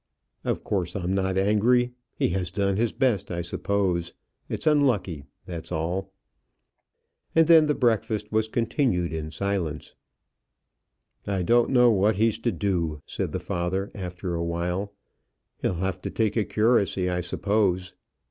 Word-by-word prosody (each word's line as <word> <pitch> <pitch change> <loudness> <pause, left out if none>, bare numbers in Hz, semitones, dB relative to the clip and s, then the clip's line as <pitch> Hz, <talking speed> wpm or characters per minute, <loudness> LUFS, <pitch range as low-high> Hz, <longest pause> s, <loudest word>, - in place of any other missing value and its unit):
Of - - -2
course, 90 -4 -2
I'm 95 -1 -1
not 95 -1 0
angry. 115 +5 +3 0.2
He - - +1
has 90 0 -1
done 100 +1 0
his 115 +2 +1
best, 120 -8 0
I 85 -1 -2
suppose. 90 -1 -1 0.4
It's - - -3
unlucky, 120 - +2 0.2
that's 85 -1 -7
all." 90 +4 -2 1.2
And 165 0 +6
then 160 -1 +7
the 150 - +1
breakfast 110 -3 0
was 110 0 +1
continued 110 - 0
in 80 -1 -4
silence. 85 -2 -3 1.3
"I 95 -2 0
don't 120 +5 +3
know 125 -2 +5
what 105 +1 +3
he's 110 +2 +2
to 120 - 0
do," 85 -5 -1
said - - -3
the - - -2
father, 90 +3 -2
after 90 -2 -5
awhile; 85 +4 -2 0.7
"he'll 95 - 0
have 95 +1 -2
to - - -4
take 110 -2 0
a 110 -3 +1
curacy, 105 -4 +2
I 90 0 0
suppose." 95 0 0
95 Hz, 145 wpm, -26 LUFS, 90-110 Hz, 1.3 s, then